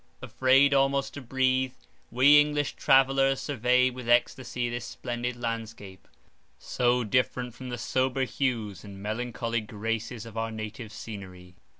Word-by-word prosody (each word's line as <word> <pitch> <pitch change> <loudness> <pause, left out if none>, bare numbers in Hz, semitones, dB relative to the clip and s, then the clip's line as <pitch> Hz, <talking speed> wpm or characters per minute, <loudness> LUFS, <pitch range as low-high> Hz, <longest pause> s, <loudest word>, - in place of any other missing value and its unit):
Afraid 130 +3 +3
almost 135 0 +2
to 145 - -7
breathe, 130 0 0 0.3
we 140 +5 +6
English 145 -1 -1
travellers 135 0 +3
surveyed 125 -1 +2
with 125 -2 -7
extasy 120 0 +1
this 120 0 -4
splendid 120 +1 -4
landscape, 115 -5 -6 0.5
so 125 0 0
different 125 +2 0
from 130 +1 -9
the 120 - -4
sober 130 +2 0
hues 115 - -2
and 100 -1 -10
melancholy 115 +1 -2
graces 110 +1 -4
of 115 -1 -11
our 115 0 -1
native 110 0 -7
scenery. 95 -5 -9
120 Hz, 130 wpm, -27 LUFS, 110-130 Hz, 0.5 s, we